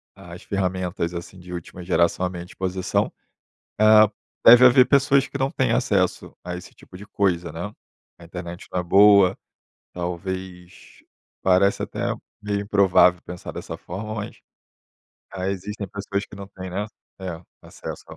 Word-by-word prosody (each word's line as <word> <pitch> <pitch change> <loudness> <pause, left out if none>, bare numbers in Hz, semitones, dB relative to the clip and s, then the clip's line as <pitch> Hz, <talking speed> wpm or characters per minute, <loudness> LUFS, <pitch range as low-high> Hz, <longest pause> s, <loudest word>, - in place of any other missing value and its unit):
as - - -11
ferramentas, 95 -2 -2
assim, 85 +2 -8
de 90 0 -10
última 90 +1 -8
geração 85 0 +1
a - - -1
minha 90 -1 -7
disposição. 95 0 -2 0.7
Ah, 110 0 +7 0.4
deve 120 +2 +9
haver 125 0 +7
pessoas 140 0 +3
que - - -20
não 135 0 0
têm - - 0
acesso - - 0
a 90 0 -5
esse 90 - -10
tipo - - -16
de 100 +3 -10
coisa, 90 -4 0
né, 85 +6 -6 0.5
a 85 - -15
internet 85 0 -8
não 90 - -1
é - - -2
boa, 100 +1 +6 0.6
talvez, 90 0 -7 0.4
parece 95 +2 +3
até - - -5 0.4
meio 100 -1 -2
improvável 95 -3 +4
pensar 90 0 -8
dessa - - -7
forma, 105 +5 -6
mas, 105 -1 -6 0.9
ah, 95 -1 -4
existem 100 +2 -5
pessoas 100 +1 -4
que 105 - -13
não 100 0 -9
têm, 95 -1 -9
né, 100 +3 -3 0.3
é 90 -3 -5 0.2
acesso. - - -9
95 Hz, 150 wpm, -23 LUFS, 90-100 Hz, 0.9 s, deve